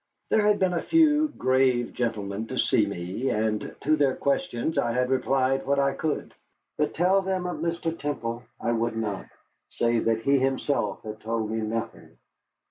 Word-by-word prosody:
There 220 - +4
had 210 0 +3
been 185 -1 +1
a 170 - 0
few 310 -2 +4
grave 130 - +1
gentlemen 110 -2 -2
to - - -5
see - - +3
me, 90 +9 -3
and 110 0 -1
to 155 +2 +3
their 140 -3 +2
questions 140 +1 -1
I 120 -3 0
had 125 +1 0
replied 130 0 +1
what 140 0 +2
I 140 0 +2
could. 155 +2 -3 0.4
But - - -1
tell 185 +4 +3
them 190 -1 -2
of 180 - -3
Mr. 165 -1 -2
Temple 120 -7 -3 0.2
I 115 - -1
would 115 0 -1
not, 105 -3 -3 0.4
save 115 -1 0
that 115 0 +1
he 140 +1 +4
himself 135 -5 -1
had 110 0 -7
told 110 0 -2
me 110 - -1
nothing. 110 +1 -5
130 Hz, 175 wpm, -26 LUFS, 115-160 Hz, 0.4 s, There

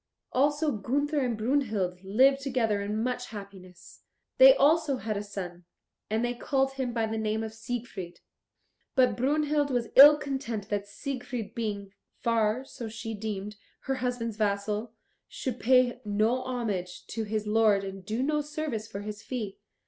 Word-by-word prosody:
Also 290 +3 +2
Gunther 285 +7 0
and 245 -4 0
Brunhild 215 -7 0
lived 260 +8 +4
together 235 -7 0
in 210 +2 -2
much 250 0 -2
happiness. 195 -4 -11 0.4
They - - +10
also 310 - +3
had 215 -2 -3
a 200 - -2
son, 180 -4 -7 0.4
and 220 +3 +1
they 240 - -1
called 270 +2 0
him 260 -2 -2
by 230 -1 0
the 220 0 -3
name 220 0 -1
of 220 0 -5
Siegfried. 220 -6 -6 0.8
But 255 -1 +4
Brunhild 295 +2 +1
was 245 -3 -1
ill 295 +2 +10
content 265 -8 -4
that 205 -1 -2
Siegfried 245 -1 -5
being, 205 -4 -4 0.3
far 230 +1 +1
so 235 -4 -7
she 225 +1 -6
deemed, 210 -1 -5 0.2
her 270 0 -2
husband's 245 -3 -2
vassal, 210 +1 -1 0.4
should 250 -2 -4
pay 250 0 +3
no 215 +4 +1
homage 215 -8 -3
to 225 - -4
his 215 0 -2
lord 210 -2 +3
and 195 -1 -7
do 220 +6 -2
no 300 +1 +1
service 295 -7 -4
for 200 -2 -6
his 210 +1 -6
fee. 220 -6 -5
225 Hz, 155 wpm, -28 LUFS, 210-260 Hz, 0.8 s, They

